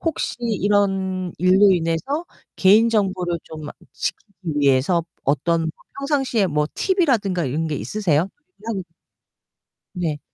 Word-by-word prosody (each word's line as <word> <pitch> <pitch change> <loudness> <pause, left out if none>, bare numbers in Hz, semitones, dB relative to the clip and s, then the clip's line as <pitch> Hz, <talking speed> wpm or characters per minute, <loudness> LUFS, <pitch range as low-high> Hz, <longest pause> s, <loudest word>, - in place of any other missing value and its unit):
혹시 325 -2 -2
이런 195 -4 0
일로 190 +3 +5
인해서 175 - -1 0.3
개인정보를 195 -4 +3
좀 155 -1 -9 0.3
지키기 200 -3 -5 0.3
위해서 140 +5 +3 0.2
어떤 165 +3 +1 0.3
평상시에 270 -7 +1
뭐 150 -2 0
팁이라든가 240 - +1
이런 150 +5 -1
게 155 - -2
있으세요? 180 -3 0 1.6
네. 160 -5 -2
185 Hz, 240 characters per minute, -22 LUFS, 165-210 Hz, 1.6 s, 일로